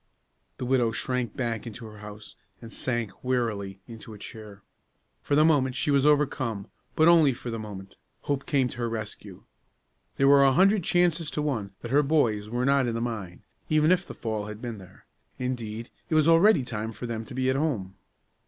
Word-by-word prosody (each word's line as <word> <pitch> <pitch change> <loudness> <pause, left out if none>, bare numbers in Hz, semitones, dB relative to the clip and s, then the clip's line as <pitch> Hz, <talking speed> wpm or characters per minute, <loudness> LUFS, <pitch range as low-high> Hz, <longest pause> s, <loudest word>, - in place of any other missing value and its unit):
The - - -4
widow 125 -3 +2
shrank 125 +4 -2
back 120 -3 -2
into 115 +1 -8
her 105 -1 -11
house, 105 0 -10 0.2
and 115 -1 -11
sank, 120 -5 -3
weakly, 105 -6 -2
into 115 -2 -10
a - - -11
chair. 105 -1 -10 0.6
For 145 - 0
the 155 +1 +5
moment 135 -5 +3
she 145 - 0
was 140 0 +4
overcome; 130 -8 +1 0.2
but 160 - +5
only 160 -5 +6
for 120 0 -7
the 115 - -4
moment. 95 -3 -8 0.3
Hope 140 -1 -2
came 135 -4 +2
to - - -9
her 120 -1 -1
rescue. 110 -2 -7 0.7
There 135 - +4
were 140 0 +7
a 135 -1 +5
hundred 195 +5 +4
chances 170 -2 +2
to 150 - -2
one 110 -10 -2
that 120 - -6
her 145 +2 +5
boys 120 -9 +1
were 120 +2 -1
not 140 -1 +3
in 115 - -2
the - - -1
mine, 110 -7 -5 0.3
even 155 +1 +4
if 185 0 +2
the - - -8
fall 110 -2 -3
had 105 0 -7
been 115 -3 -6
there; 95 -1 -16 0.3
indeed, 115 -3 -4 0.2
it 160 - +1
was 155 0 +4
already 165 0 +5
time 110 -2 -4
for 110 +4 -7
them 115 -1 -4
to 130 - -10
be 130 0 +1
at - - -1
home. 130 -11 -1
125 Hz, 200 wpm, -27 LUFS, 110-140 Hz, 0.7 s, were